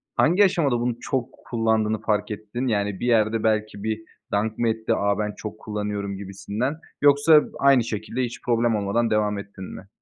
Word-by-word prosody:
hangi 180 +6 +4
aşamada 155 -10 +1
bunu 120 0 -1
çok 130 -2 -2 0.2
kullandığını 110 -2 +1
fark 105 -1 0
ettin? 110 +5 -4
Yani 100 -4 0
bir 120 - -2
yerde 110 -1 +2
belki 110 -2 0
bir 110 0 -2 0.3
dank 110 +2 0
mı 115 - +1
etti? 110 0 0
A 100 0 0
ben 105 0 -1
çok 110 0 -7
kullanıyorum 105 -2 -4
gibisinden. 100 +7 -3 0.3
Yoksa 145 +2 +6 0.2
aynı 135 -3 +5
şekilde 110 +2 -3
hiç 120 -1 -5
problem 120 -1 +1
olmadan 105 +3 0
devam 105 -1 +1
ettin 100 -1 -9
mi? 95 - -11
110 Hz, 175 wpm, -24 LUFS, 105-120 Hz, 0.3 s, Yoksa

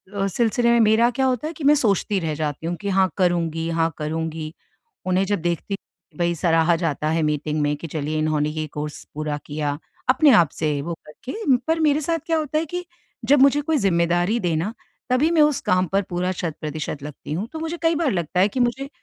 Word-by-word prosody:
अ, 195 - 0
सिलसिले 235 +4 +1
में 235 - +4
मेरा 225 +2 +5
क्या 265 - +2
होता 260 +3 0
है 325 - -5
कि 320 - -9
मैं 290 +2 +6
सोचती 205 -5 +1
रह 160 -3 -2
जाती 150 +1 -3
हूँ 175 - -1
कि 200 - -2
हाँ 190 -1 +3
करुँगी, 165 -3 +1
हाँ 165 0 +1
करुँगी। 160 +1 -4 0.5
उन्हें 185 +1 +2
जब 200 -3 -1
देखती 175 +3 -2
कि 175 -5 -22
भई, 170 0 +1
सराहा 165 +1 +3
जाता 155 -2 -1
है 160 0 +1
मीटिंग 150 0 -1
में 145 0 +1
कि, 165 - -7
"चलिए, 155 0 -3
इन्होंने 155 -1 +1
ये 155 0 -3
कोर्स 150 0 -5
पूरा 150 -1 -3
किया।" 145 -1 -2 0.3
अपने 275 +2 +6
आप 170 -6 +5
से 155 -1 -1
वो 170 +3 -4
करके। 260 - -1
पर 325 0 +1
मेरे 305 -1 +3
साथ 330 +2 0
क्या 325 -1 +1
होता 305 0 -1
है 325 - 0
कि 355 +3 -5 0.4
जब 285 0 +5
मुझे 280 +1 +5
कोई 310 +1 0
ज़िम्मेदारी 175 +2 +2
दे 175 -5 0
ना, 190 +8 -2 0.4
तभी 265 +6 +3
मैं 320 -2 +4
उस 300 -3 +3
काम 185 0 +3
पर 200 - +4
पूरा 180 +1 -1
शत-प्रतिशत 155 -4 -4
लगती 150 0 -7
हूँ। 195 +7 -3
तो 320 - -5
मुझे 325 +1 -4
कई 330 0 +2
बार 305 -4 +1
लगता 175 -1 -1
है 195 - +5
कि 255 - -4
मुझे 255 +3 0
180 Hz, 220 wpm, -22 LUFS, 155-255 Hz, 0.5 s, मैं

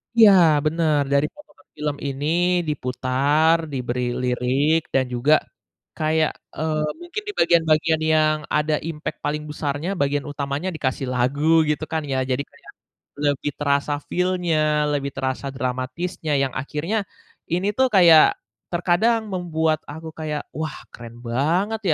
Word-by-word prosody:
Iya, 220 -3 +8 0.3
bener. 155 -2 +2
Dari 140 +1 +3
potongan 295 -10 -19
film 150 -1 -2
ini 140 +1 -4 0.4
diputar, 140 +4 +1 0.2
diberi 125 -1 -2 0.2
lirik 130 +6 +1
dan 130 -1 +3
juga 135 +6 +3 0.6
kayak, 155 0 +1 0.3
eee, 155 -1 -1 0.2
mungkin 350 +5 -5
di 415 - -3
bagian-bagian 160 -1 +3
yang 155 0 +3 0.2
ada 150 0 +1
impact 155 -1 -5
paling 150 +1 -1
besarnya, 150 +3 -3
bagian 140 0 0
utamanya 140 +5 -3
dikasih 130 -2 -2
lagu, 145 +6 +3
gitu 150 +1 -1
kan 160 - 0
ya. 135 -2 -2
Jadi 135 +3 0
kayak - - -16 0.5
lebih 145 0 0
terasa 140 0 +1
feel-nya, 165 -5 +1
lebih 140 -1 -1
terasa 130 +1 -3
dramatisnya, 130 +6 -3
yang 135 -1 0
akhirnya 150 +10 -3 0.5
ini 180 +3 0
tuh 260 0 +4
kayak 170 -6 +6 0.3
terkadang 205 +6 +1
membuat 160 -3 0
aku 160 +2 -8
kayak, 150 -2 -4
"Wah, 155 +1 -4 0.2
keren 115 0 -11
banget 170 - 0
150 Hz, 130 wpm, -22 LUFS, 140-165 Hz, 0.6 s, Iya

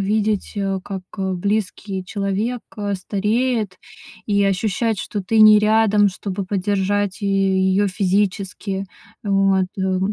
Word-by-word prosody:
видеть, 210 +1 0
э, 195 -1 -1
как 195 -2 -6 0.4
близкий 200 -1 -2
человек 205 +5 -2 0.3
стареет 210 +2 -1 0.5
и 200 -1 +2
ощущать, 205 +2 0
что 205 - -4
ты 220 +4 +2
не 215 0 +9
рядом, 210 -1 +4
чтобы 195 +1 -5
поддержать 200 +1 -1
и 200 - 0
ее 195 0 +2
физически. 195 0 -1 0.4
Вот, 195 -2 +2
э. 190 -1 0
200 Hz, 115 wpm, -20 LUFS, 190-210 Hz, 0.5 s, не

